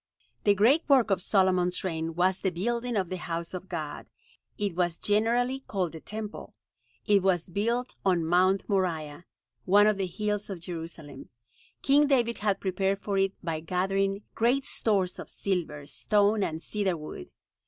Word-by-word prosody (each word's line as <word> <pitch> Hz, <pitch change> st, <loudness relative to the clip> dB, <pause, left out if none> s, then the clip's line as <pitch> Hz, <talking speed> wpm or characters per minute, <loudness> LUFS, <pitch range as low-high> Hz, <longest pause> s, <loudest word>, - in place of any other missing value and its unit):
The 205 Hz, -1 st, +5 dB
great 245 Hz, -, +5 dB
work 255 Hz, -6 st, +5 dB
of 185 Hz, -2 st, +2 dB
Solomon's 185 Hz, -2 st, +2 dB
reign 165 Hz, -3 st, -3 dB
was 185 Hz, +2 st, +2 dB
the 190 Hz, -, 0 dB
building 235 Hz, +7 st, -2 dB
of 190 Hz, -4 st, 0 dB
the 185 Hz, -, -3 dB
House 170 Hz, 0 st, -4 dB
of 185 Hz, +1 st, -7 dB
God. 155 Hz, -4 st, -5 dB, 0.5 s
It 205 Hz, -3 st, -1 dB
was 175 Hz, -1 st, 0 dB
generally 235 Hz, +5 st, +1 dB
called 185 Hz, -5 st, -1 dB
the 160 Hz, -, -9 dB
Temple. 215 Hz, +4 st, -7 dB, 0.5 s
It 205 Hz, -2 st, +4 dB
was 180 Hz, -2 st, +1 dB
built 235 Hz, +6 st, -1 dB
on 180 Hz, -4 st, +2 dB
Mount 185 Hz, +3 st, +3 dB
Moriah, 170 Hz, -5 st, -1 dB, 0.4 s
one 205 Hz, +3 st, +6 dB
of 215 Hz, -1 st, +3 dB
the 190 Hz, -1 st, -1 dB
hills 210 Hz, +3 st, -2 dB
of 190 Hz, -3 st, -5 dB
Jerusalem. 165 Hz, -3 st, -8 dB, 0.5 s
King 290 Hz, +2 st, +5 dB
David 240 Hz, -4 st, +2 dB
had 205 Hz, -2 st, 0 dB
prepared 195 Hz, +1 st, 0 dB
for 200 Hz, -1 st, -1 dB
it 195 Hz, 0 st, +2 dB
by 165 Hz, -2 st, -2 dB
gathering 195 Hz, +4 st, -1 dB
great 250 Hz, +4 st, +2 dB
stores 195 Hz, -5 st, 0 dB
of -, -, -8 dB
silver, 165 Hz, -7 st, -3 dB
stone 205 Hz, +6 st, +1 dB
and 160 Hz, -3 st, -2 dB
cedar 195 Hz, -5 st, -1 dB
wood. 150 Hz, -, -8 dB
195 Hz, 165 wpm, -28 LUFS, 175-210 Hz, 0.5 s, one